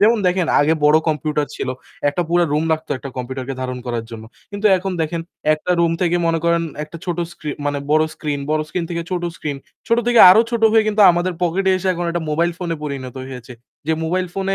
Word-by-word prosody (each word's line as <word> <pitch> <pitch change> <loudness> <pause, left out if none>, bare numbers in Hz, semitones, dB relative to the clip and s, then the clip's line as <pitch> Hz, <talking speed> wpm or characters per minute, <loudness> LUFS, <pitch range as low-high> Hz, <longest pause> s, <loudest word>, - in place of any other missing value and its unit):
যেমন 220 +2 +5
দেখেন 180 -1 +1
আগে 155 +3 +3
বড় 150 +1 +6
কম্পিউটার 150 -1 -1
ছিল, 130 - -4 0.4
একটা 145 +5 0
পুরা 175 0 +3
রুম 155 +2 +1
লাগতো 160 -1 -3
একটা 140 - -8
কম্পিউটারকে 130 +1 -4
ধারণ 130 0 -4
করার 120 -2 -3
জন্য। 110 -1 -8 0.3
কিন্তু 200 +1 0
এখন 190 +1 -4
দেখেন 165 +1 -2 0.3
একটা 155 +4 -2
রুম 170 -1 +3
থেকে 175 0 +2
মনে 165 0 +1
করেন 170 0 +2 0.2
একটা 160 +2 -11
ছোট 175 -1 -3
স্ক্রি 155 -3 -6 0.2
মানে 145 0 -1
বড় 155 +1 +4
স্ক্রিন, 145 -2 -3
বড় 155 0 +2
স্ক্রিন 175 0 -2
থেকে 170 0 -2
ছোট 180 -1 -2
স্ক্রিন, 145 -2 -4 0.3
ছোট 230 +1 +3
থেকে 240 -1 +5
আরও 220 +5 +7
ছোট 235 -2 -2
হয়ে 220 -1 +5
কিন্তু 210 0 +3
আমাদের 175 +2 -1
পকেটে 190 +3 +1
এসে 185 +1 -2
এখন 175 0 -3
এটা 170 0 -2
মোবাইল 170 +3 +1
ফোনে 170 -2 -2
পরিণত 135 -3 -6
হয়েছে। 125 -1 -9 0.3
যে 160 - +2
মোবাইল 180 +3 0
ফোনে 195 0 -1
165 Hz, 215 wpm, -19 LUFS, 145-180 Hz, 0.4 s, আরও